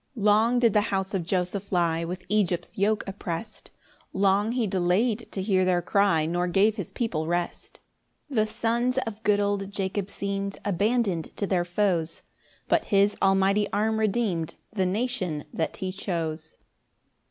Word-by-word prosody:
3 215 - -5
Long 220 +4 +4
did 235 -4 +4
the 210 - +4
house 190 0 -1
of 190 -3 0
Joseph 185 +3 -2
lie 170 -2 +1
With 180 +2 -5
Egypt's 185 -4 0
yoke 210 +2 +1
opprest: 195 +1 -6 0.4
Long 200 +3 +2
he 245 -2 +1
delay'd 200 +5 0
to 190 - -3
hear 190 -2 +2
their 180 -1 +2
cry, 200 -6 +2
Nor 175 +2 0
gave 200 +4 +3
his 195 -7 -6
people 165 -10 -2
rest. 175 0 -3 0.5
4 275 - -7
The 215 0 +3
sons 235 +4 0
of 220 -1 -6
good 210 -2 +3
old 200 -1 0
Jacob 195 0 -3
seem'd 200 0 -3
Abandon'd 205 -2 0
to 200 - 0
their 185 -3 +1
foes; 175 -3 0 0.4
But - - +2
his 200 0 +3
almighty 195 +2 +3
arm 220 +2 +1
redeem'd 200 -7 0 0.2
The 190 -3 +1
nation 185 - -2
that 160 - -2
he 190 -1 -3
chose. 165 -4 -4
195 Hz, 160 wpm, -26 LUFS, 180-210 Hz, 0.5 s, Long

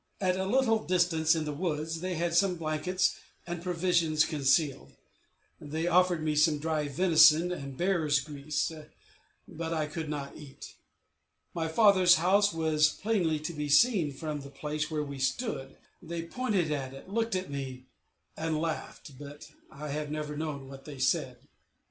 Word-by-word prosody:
At 185 -2 +1
a 190 0 -2
little 225 -1 +2
distance 170 -3 +2
in 160 -1 -2
the 150 - -3
woods 160 0 -3
they 185 0 -2
had 170 +1 -1
some 180 +1 +3
blankets 165 +3 -1 0.3
and 175 -1 -5
provisions 170 -3 +1
concealed; 140 - +1 0.7
they 155 +3 -4
offered 175 -1 +3
me 155 -1 0
some 150 0 +4
dry 155 -1 -1
venison 160 +1 +5
and 140 -6 -6
bear's 170 -6 +2
grease, 145 +2 -3 0.8
but 165 +1 -5
I 155 -1 0
could 155 0 -5
not 140 -2 -5
eat. 140 -2 -11 0.8
My 165 -1 -2
father's 185 0 +5
house 195 +5 +3
was 155 -2 +2
plainly 180 -6 0
to 160 +2 -4
be 150 -1 -4
seen 170 - +4
from 150 +1 -5
the 140 - -10
place 150 +2 -4
where 155 -2 -2
we 140 -1 -7
stood; 135 - -2 0.2
they 170 0 -5
pointed 190 -4 -1
at 135 -2 -3
it, 135 - -12
looked 225 +1 -1
at 185 -4 -3
me, 130 -2 -6 0.5
and 160 -1 -2
laughed, 155 -4 -5
but 145 +1 -11 0.2
I 150 +1 -8
have 150 +1 -3
never 150 0 -4
known 145 -3 -4
what 135 0 -11
they 145 -3 -9
said. 130 0 -1
155 Hz, 160 wpm, -29 LUFS, 150-175 Hz, 0.8 s, venison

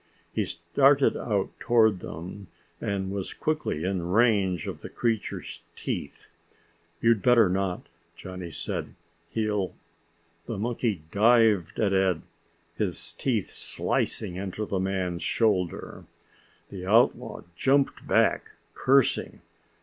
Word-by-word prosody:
He - - 0
started - - +3
out - - -1
toward 110 -5 +4
them, 90 +4 -8 0.3
and 95 -1 -2
was 100 -1 -4
quickly 155 - -1
in 95 -1 -1
range 100 -5 +3
of - - -6
the - - -7
creature's 115 -3 -2
teeth. - - -5 0.7
"You'd 115 -3 +4
better 120 -1 +5
not," 95 -1 -1 0.3
Johnny 90 -2 -7
said. 80 - -4 0.3
"He'll 105 -2 -1 0.4
" 85 0 -39
The 115 - -3
monkey 110 -5 -1
dived 110 -4 +4
at 100 -2 +2
Ed, 95 -3 +2 0.5
his 85 -5 -2
teeth 110 +2 -1
slicing 90 - -1
into 100 +2 -4
the 100 -2 -2
man's 95 -2 -1
shoulder. 95 -7 0 0.7
The 95 -2 -7
outlaw 115 +2 +2
jumped 135 +8 +1
back, - - +2 0.2
cursing. 135 -1 +2
100 Hz, 115 wpm, -27 LUFS, 90-115 Hz, 0.7 s, better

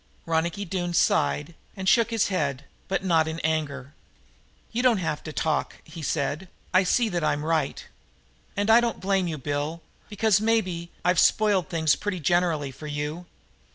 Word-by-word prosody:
Ronicky 165 +4 -1
Doone 175 -1 -2
sighed 70 - +2 0.2
and 190 0 -4
shook 230 +3 +4
his 225 -3 +1
head, 145 -7 -1 0.2
but 195 0 -1
not 165 -4 +3
in 160 +1 -4
anger. 145 -3 -2 0.8
"You 235 - -1
don't 250 -3 +4
have 160 -5 -2
to 155 - -5
talk," 155 0 -1
he 160 +1 -10
said. 150 +4 -2 0.3
"I 185 +1 +5
see 230 +5 +2
that 175 -4 -2
I'm 150 0 0
right. 160 -3 -1 0.7
And 205 +2 +2
I 235 +2 +7
don't 235 -1 -1
blame 190 -1 +1
you, 160 -2 -3
Bill, 145 +4 -3 0.3
because, 210 -1 +2
maybe, 185 -7 0 0.2
I've 180 -1 +3
spoiled 205 -5 +3
things 160 -2 +2
pretty 205 -3 -3
generally 165 -3 +1
for 150 +4 -10
you." 150 +4 -4
170 Hz, 165 wpm, -26 LUFS, 155-195 Hz, 0.8 s, I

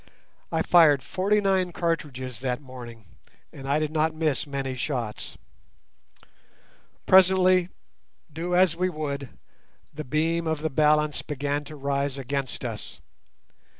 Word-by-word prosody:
I 160 0 +1
fired 155 -6 +5
forty 200 +3 +1
nine 190 -2 +1
cartridges 140 -8 -3
that 125 -1 -2
morning, 120 -5 -11 0.5
and 135 0 -8
I 140 - +3
did 155 -1 -1
not 160 0 +1
miss 155 -3 0
many 135 -2 -3
shots. 125 -5 -4 1.7
Presently, 185 -1 +5 0.6
do 175 +3 -2
as 180 -3 +4
we 185 +2 0
would, 140 -5 -4 0.6
the 155 +1 -5
beam 160 +4 0
of 160 -1 -2
the 160 - -1
balance 150 +1 +2
began 145 0 -2
to 155 - -9
rise 140 -1 -2
against 135 0 -4
us. - - -6
150 Hz, 125 wpm, -26 LUFS, 135-165 Hz, 1.7 s, fired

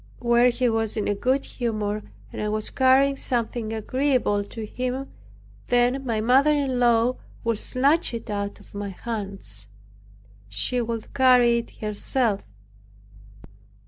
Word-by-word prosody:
When 240 +1 +4
he 245 +1 0
was 225 -1 0
in 210 - -1
a 205 - +2
good 260 +7 0
humor 215 -3 -2 0.3
and - - -4
I 210 - -1
was 215 0 -1
carrying 270 +1 +4
something 235 -3 -2
agreeable 240 -2 0
to 220 +1 -7
him, 255 +4 -4 0.6
then 245 +2 +2
my 230 -4 -1
mother 255 +6 +4
in 275 -4 +1
law 240 +1 +3 0.3
would 230 -2 0
snatch 285 +7 +2
it 230 - -7
out 200 -1 -3
of - - -19
my 205 0 -4
hands. 195 - -5 0.8
She 175 - 0
would 230 -1 -4
carry 250 -3 +5
it 235 - -9
herself. 215 +1 -1
235 Hz, 140 wpm, -24 LUFS, 215-255 Hz, 0.8 s, carry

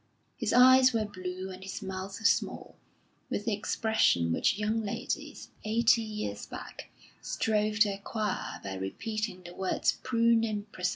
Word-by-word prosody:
His - - -2
eyes 255 0 +7
were 220 -2 +1
blue 185 -1 -6
and 185 0 -9
his 190 0 -6
mouth 190 +1 -5
small, - - +1 0.5
with 205 - -3
the 225 - +1
expression 205 - +2
which 200 - +2
young 215 +2 0
ladies, 200 - -4
eighty 230 +1 +3
years 210 - -5
back, - - -9 0.3
strove 215 -1 0
to 210 - +6
acquire 205 +1 -3
by 95 - -4
repeating 210 - -4
the 175 0 -10
words 190 0 0
prune 230 -2 +3
and 210 -2 -3
prism. 180 0 -1
210 Hz, 150 wpm, -30 LUFS, 185-225 Hz, 0.5 s, eyes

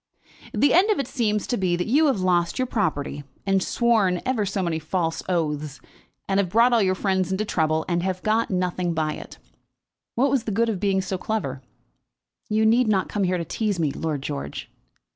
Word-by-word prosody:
"The 285 - +3
end 375 +6 +5
of 425 - +3
it 275 - -1
seems 215 -6 0
to 245 - -1
be 185 -2 +1
that 175 - -2
you 300 +7 +3
have 260 -9 +1
lost 175 -2 +1
your 255 - +1
property, 155 - -2 0.2
and 195 -1 +2
sworn 215 -5 +2
ever 230 -6 0
so 195 0 -1
many 165 -2 -1
false 165 +1 -2
oaths, 150 -4 -2 0.5
and 195 0 +1
have 190 -3 +1
brought 230 +5 +4
all 230 - +4
your 185 -1 +2
friends 190 -2 0
into 195 +3 -1
trouble, 160 -4 0
and 175 -1 0
have 185 0 -3
got 220 +1 +1
nothing 180 -2 -1
by 155 -1 0
it. - - -10 0.8
What 265 +3 +2
was 265 -4 +1
the 220 - -2
good 230 +3 +1
of 205 -5 -2
being 195 -1 +1
so 190 -1 -3
clever?" 140 -13 -3 0.9
"You 215 +1 +2
need 235 +2 +4
not 195 -3 +1
come 205 -2 0
here 180 0 +1
to 170 - -3
tease 205 +2 -2
me, 155 -4 +1
Lord 150 -2 -3
George." 140 - -5
190 Hz, 205 wpm, -24 LUFS, 170-220 Hz, 0.9 s, end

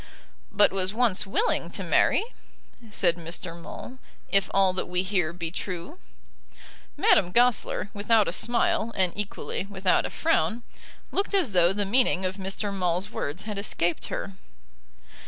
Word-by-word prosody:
"But 205 0 +4
was 190 +1 -1
once 225 -5 +2
willing 435 - 0
to - - -5
marry," - - +3 0.7
said 175 -5 +1
Mr. 170 +1 -6
Maule, 245 +9 -9 0.3
"if 195 -1 +2
all 195 -1 +3
that 185 - -3
we 180 +1 -1
hear 180 -4 0
be 170 -2 -5
true." 180 -2 -5 1.0
Madame 180 - +4
Goesler, 240 -2 +2
without 210 +1 +3
a - - 0
smile 280 - +1
and 185 -2 +1
equally 205 -1 -4
without 190 -2 +1
a - - -8
frown, 240 -8 0 0.5
looked 400 0 0
as 350 - +2
though 175 -2 +4
the 205 +1 -1
meaning 200 -3 +3
of 185 +1 -3
Mr. 195 +1 -3
Maule's 180 0 -1
words 150 +7 -4
had 210 -2 -5
escaped 175 -4 -1
her. 195 - -5
195 Hz, 150 wpm, -26 LUFS, 180-215 Hz, 1.0 s, But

